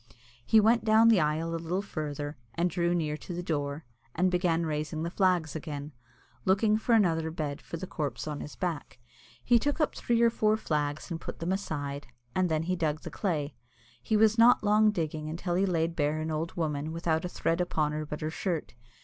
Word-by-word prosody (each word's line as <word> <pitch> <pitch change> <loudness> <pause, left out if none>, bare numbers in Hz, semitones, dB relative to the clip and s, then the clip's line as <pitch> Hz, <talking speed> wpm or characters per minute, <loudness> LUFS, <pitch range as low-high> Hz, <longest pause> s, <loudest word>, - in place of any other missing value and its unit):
He 220 - +5
went 225 +2 +4
down 220 +1 +6
the 220 -4 +5
aisle 155 +2 0
a 165 - -3
little 180 +4 -2
further, 150 -5 -4 0.2
and 175 +1 +1
drew 175 0 +1
near 155 -3 -1
to 175 - -7
the 175 - -4
door, 145 -2 -2 0.3
and 180 +2 +2
began 175 -2 +1
raising 155 0 -2
the 170 - -3
flags 180 -6 +1
again, 150 -1 -5 0.5
looking 210 +3 +3
for 230 +2 +2
another 165 -6 +2
bed 150 -3 -4
for 170 - -7
the 185 - -5
corpse 155 -4 -4
on 150 -1 -3
his 150 - -8
back. 170 -8 -4 0.5
He 240 -1 +5
took 290 +5 -1
up 305 - +1
three 235 -1 0
or 230 - +5
four 215 -1 +2
flags 150 -3 -2
and 165 0 -4
put - - -6
them 165 +2 -2
aside, 145 -8 -3 0.3
and 185 -1 +1
then 160 0 0
he 185 +2 0
dug 155 -3 -1
the - - -7
clay. 155 -7 -2 0.5
He 215 - +1
was 220 +1 +4
not 235 0 +6
long 215 +1 +5
digging 155 -5 -2
until 170 +2 -3
he 190 +3 +2
laid 165 -2 0
bare 150 0 0
an 160 0 -3
old 155 +2 -3
woman 155 -2 -2
without 165 -1 0
a 180 - -3
thread 165 0 0
upon 155 -4 0
her 155 +1 -3
but 150 0 -6
her 155 +1 -2
shirt. 170 -1 -3
165 Hz, 210 wpm, -29 LUFS, 155-190 Hz, 0.5 s, down